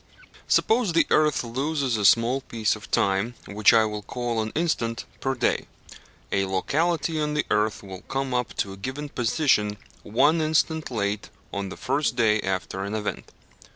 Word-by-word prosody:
Suppose 225 -5 +3
the 165 - +4
earth 150 -3 +3
loses 135 +2 -1
a 105 -2 0
small 120 +6 +4
piece 115 -5 -1
of 105 - -12
time, 100 +5 +1
which 105 0 +4
I 115 -2 +5
will 105 -1 -4
call 120 +2 -2
an 110 0 -3
instant, 120 -9 -1
per 135 0 -1
day; 120 - 0 0.6
a 95 0 +1
locality 155 - 0
on 150 0 -1
the 150 - +1
earth 105 0 +1
will 95 -1 -9
come 135 -1 -2
up 125 -1 -1
to 100 - -2
a - - -11
given 130 +8 -5
position 115 -5 +1 0.2
one 145 +9 +3
instant 160 0 +1
late 105 -3 -2 0.2
on 100 -1 -3
the - - -8
first 135 -1 0
day 110 -3 +3
after 95 0 -3
an 100 +2 -3
event. 105 -1 -4
115 Hz, 170 wpm, -25 LUFS, 105-145 Hz, 0.6 s, I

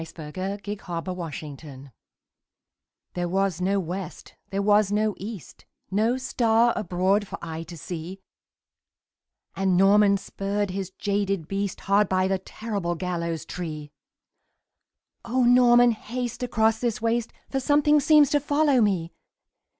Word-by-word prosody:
Y - - -4
Z 165 - -12
The 150 -2 -8
Demon 185 +3 -3
of 200 0 -10
the 205 - -3 0.7
Gibbet 140 -2 -10 1.2
THERE 175 -1 -2
was 190 -1 0
no 195 +2 +1
west, 185 0 -6 0.2
there 195 - -2
was 205 0 +3
no 210 0 +1
east, 205 -3 -9 0.3
No 220 +6 +2
star 235 -2 +2
abroad 195 +1 0
for - - -6
eye 165 -1 -6
to 165 +1 -9
see; 175 +4 -7 1.4
And 190 -2 +1
Norman 200 +1 +5
spurred 200 0 -3
his 190 -1 -4
jaded 195 -3 -2
beast 195 +1 -3
Hard 200 0 +2
by 185 0 +2
the 190 0 0
terrible 200 -3 -4
gallows 170 -2 -3
tree. 155 -5 -6 1.3
"O 245 +2 0
Norman, 245 0 +6
haste 240 +2 -5
across 225 -2 +1
this 235 -2 -1
waste 230 +1 -1 0.2
For 270 - 0
something 295 +2 +3
seems 295 -1 +5
to 290 - +3
follow 290 -2 +2
me!" 185 -6 0
200 Hz, 140 wpm, -25 LUFS, 180-230 Hz, 1.4 s, Norman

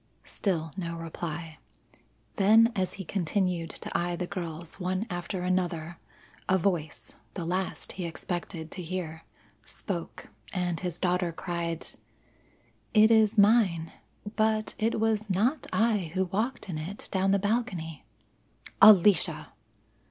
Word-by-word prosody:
Still 165 -6 -2
no 170 -3 -4
reply, 165 -1 -6 0.8
then 220 +4 +6
as 185 -2 -1
he 190 - -7
continued 180 -2 -1
to - - -7
eye 175 0 0
the 180 - -3
girls 170 -1 -6
one 185 +3 -1
after 175 +1 -3
another 175 -2 -1 0.5
a 190 - +5
voice 160 - -2 0.2
the 170 - -3
last 185 +2 -2
he 180 -2 -4
expected 165 -1 -5
to 185 - -5
hear 165 -2 -5 0.4
spoke - - -6 0.2
and 175 -3 -1
his 180 -2 -4
daughter 180 -1 +1
cried: 170 -1 -3 1.1
"It 215 +1 +7
is 220 -1 +4
mine. 200 -6 +4 0.4
But 215 0 +1
it 220 +1 +1
was 220 -1 0
not 225 - +1
I 215 -7 +1
who 190 0 +2
walked 220 +8 -2
in 165 -5 -4
it 180 +7 -6
down 190 0 +1
the 200 - +4
balcony." 195 - -2 0.8
"Alicia!" 205 -4 +6
180 Hz, 130 wpm, -28 LUFS, 170-205 Hz, 1.1 s, It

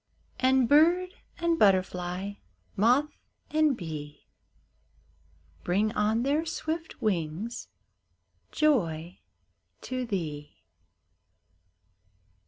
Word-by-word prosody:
And 260 -1 +4
bird 340 +6 +4 0.3
and 335 -1 0
butterfly, 185 -1 +1 0.4
moth 250 +8 +3 0.4
and 305 -4 +3
bee, 150 -4 -7 1.4
Bring 205 +5 +1
on 215 +3 +1
their 290 +4 +1
swift 325 0 -5
wings 185 +3 -2 0.8
joy 175 - +1 0.6
to 255 -1 -4
thee 155 -8 -4
220 Hz, 70 wpm, -28 LUFS, 180-300 Hz, 1.4 s, And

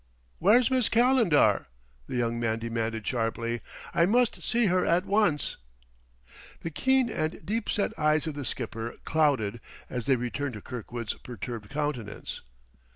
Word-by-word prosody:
"Where's 230 +8 +5
Miss 255 -4 +2
Calendar?" 235 - +4 0.4
the - - -5
young 115 -1 0
man 115 -1 0
demanded 115 -1 -3
sharply. 115 -1 -1 0.3
"I 170 - +4
must 240 +3 +2
see 235 0 +2
her 185 -1 +3
at 175 +3 +2
once!" 200 -8 +2 1.0
The 165 - -4
keen 260 - +3
and 160 -7 -3
deep 225 +4 -2
set 205 - 0
eyes 155 0 +3
of 160 - -3
the 145 0 -5
skipper 115 -1 -4
clouded 135 -9 +1 0.3
as 125 -3 -3
they 135 - +5
returned 125 +2 -3
to 105 - -7
Kirkwood's 120 -2 -5
perturbed 120 -3 -7
countenance. 140 -7 -4
145 Hz, 145 wpm, -28 LUFS, -, 1.0 s, Where's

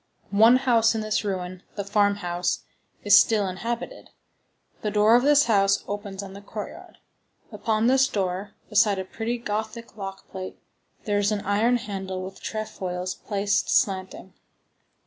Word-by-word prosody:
One 225 +4 +7
house 235 -3 +3
in 220 - -1
this 215 -1 -1
ruin, 185 -2 -4
the 200 - -3
farmhouse, 200 -3 0 0.4
is 205 -1 +6
still 210 -3 +5
inhabited. 230 +6 -5 0.7
The 210 - -1
door 210 +2 +4
of 245 - +5
this 290 +2 +5
house 195 -3 +2
opens 200 -1 -5
on 190 -1 -9
the 200 - -10
courtyard. 210 +1 -8 0.5
Upon 220 0 0
this 265 +2 +4
door, 195 -1 -3
beside 210 -2 +3
a 190 - -3
pretty 230 +5 -3
Gothic 220 +1 -5
lock 195 -1 -7
plate, 185 -1 -7 0.5
there 205 -1 0
is 205 +1 +1
an 210 -1 -1
iron 215 +5 +2
handle 190 -4 -5
with 190 +1 -9
trefoils 185 -4 -4
placed 205 0 -1
slanting. 190 -1 0
205 Hz, 145 wpm, -25 LUFS, 195-220 Hz, 0.7 s, One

